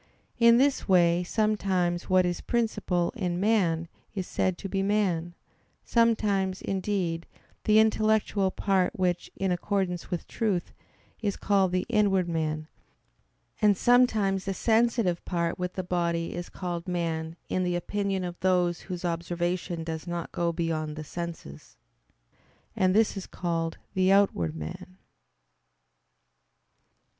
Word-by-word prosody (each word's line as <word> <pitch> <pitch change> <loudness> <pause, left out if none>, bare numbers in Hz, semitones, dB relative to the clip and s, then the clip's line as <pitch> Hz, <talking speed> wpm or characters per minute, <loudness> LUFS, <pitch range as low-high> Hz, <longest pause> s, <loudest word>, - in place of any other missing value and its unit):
In 235 0 +7
this 270 -3 +2
way 175 -1 +4
sometimes 190 -4 0
what 185 -1 +4
is 175 0 -2
princip[al] 215 -5 0
in 180 -5 -2
man 180 -6 +2 0.3
is 190 -2 -2
said 185 0 -1
to 195 - -6
be 195 0 -1
man; 185 -4 0 0.5
sometimes, 205 -5 +2
indeed, 185 -4 -2 0.4
the 215 0 +5
intellectual 215 -2 +3
part 190 -1 0
which, 180 -2 0
in 190 -1 -1
accordance 180 -1 -1
with 175 - -3
truth, 205 -7 -1 0.5
is 205 -3 -1
called 195 -2 +2
the 185 0 0
"inward" 195 -4 +2
man; 155 -2 -2 0.9
and 205 -2 +4
sometimes 220 -6 +3
the 195 -1 -2
sensitive 225 -6 +2
part 170 -1 -2
with 180 0 -3
the 185 - -3
body 170 -2 -1
is 175 0 -5
called 175 -2 -5
man 165 -2 -2
in 185 - 0
the 180 -1 0
opinion 195 +2 -1
of 175 -1 -5
those 180 -2 +2
whose 180 -1 -6
observation 175 0 -2
does 160 +1 -5
not 175 -1 -4
go 170 -1 0
beyond 160 -2 -2
the 155 - -6
senses. 165 - -8 1.0
And 185 0 +2
this 220 0 +3
is 195 - -6
called 165 -2 -2 0.2
the 185 0 +3
"outward" 140 - +3
man. 180 - -8
185 Hz, 130 wpm, -27 LUFS, 170-200 Hz, 1.0 s, In